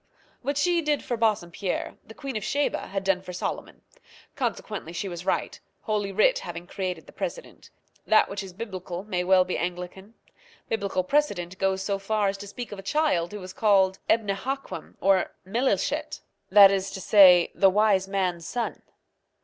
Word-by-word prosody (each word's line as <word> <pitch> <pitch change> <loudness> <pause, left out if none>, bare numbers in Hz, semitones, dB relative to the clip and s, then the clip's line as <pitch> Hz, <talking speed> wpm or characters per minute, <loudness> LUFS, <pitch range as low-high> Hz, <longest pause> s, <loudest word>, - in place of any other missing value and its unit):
What 280 +2 -2
she 345 +3 +2
did 300 -2 0
for 245 - -2
Bassompierre 200 -4 -1
the 220 - -14
Queen 275 -3 -6
of 215 - -2
Sheba 285 +7 -1
had 195 0 -3
done 190 -1 +1
for 180 -1 -9
Solomon; 180 - -5 0.5
consequently 200 -6 -4
she 185 +3 -3
was 175 0 -7
right, - - -1 0.2
Holy 210 -3 -1
Writ - - +3
having 175 - -7
created 180 -3 -4
the - - -14
precedent. - - -6 0.4
That 215 - +5
which 200 0 -5
is 195 -1 -8
biblical 185 -3 -6
may 180 -4 -2
well 185 0 +4
be 185 - -2
Anglican. 180 +4 -5 0.5
Biblical 200 -4 -1
precedent 190 -8 0
goes 190 0 0
so 195 0 -1
far 205 0 0
as 195 - -3
to 205 - -8
speak 240 +4 -7
of 205 - -7
a - - -6
child 195 - 0
who 210 - -6
was 185 0 -9
called 190 -3 +3
Ebnehaquem 225 +5 -2
or 195 0 +2
Melilechet 235 +8 -1 0.3
that 200 -1 +9
is 195 0 -1
to 195 0 -7
say, 185 -3 +6
the 195 - +5
Wise 200 -1 +3
Man's 185 -4 -2
son. 240 -1 -3
195 Hz, 175 wpm, -26 LUFS, 185-220 Hz, 0.5 s, that